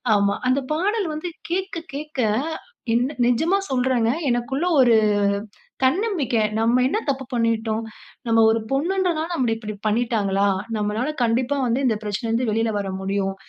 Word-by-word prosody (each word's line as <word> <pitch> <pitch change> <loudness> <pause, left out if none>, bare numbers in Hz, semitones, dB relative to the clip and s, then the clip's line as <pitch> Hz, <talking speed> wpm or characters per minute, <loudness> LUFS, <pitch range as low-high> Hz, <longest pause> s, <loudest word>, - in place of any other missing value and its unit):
ஆமா. 200 0 +2
அந்த 265 +2 +3
பாடல் 395 +3 0
வந்து 310 +4 -4 0.2
கேட்க 375 0 -2 0.2
கேட்க 295 -1 -6 0.7
என்ன 250 +5 +1
நிஜமா 320 +11 +2
சொல்றேங்க, 250 -3 +2 0.2
எனக்குள்ள 255 +6 -1 0.2
ஒரு 240 -3 +5 0.9
தன்னம்பிக்கை. 290 - +1 0.2
"நம்ம 235 +3 +3
என்ன 430 - 0
தப்பு 270 -1 -1
பண்ணிட்டோம்? 225 -1 0 0.4
நம்ம 225 0 +4
ஒரு 225 - +1
பொண்ணுன்ன்றனால, 335 +2 0
நம்மள 240 -6 +1
இப்படி 215 -1 -6
பண்ணீட்டாங்களா? 210 -3 +1 0.3
நம்மளால 215 +7 -1
கண்டிப்பா 245 +4 +1
வந்து 245 +4 +1
இந்த 220 - +1
பிரச்னைல 210 +2 -3
இருந்து 230 0 +1
வெளில 225 +1 +1
வரமுடியும்". 195 0 -2
240 Hz, 135 wpm, -22 LUFS, 220-290 Hz, 0.9 s, ஒரு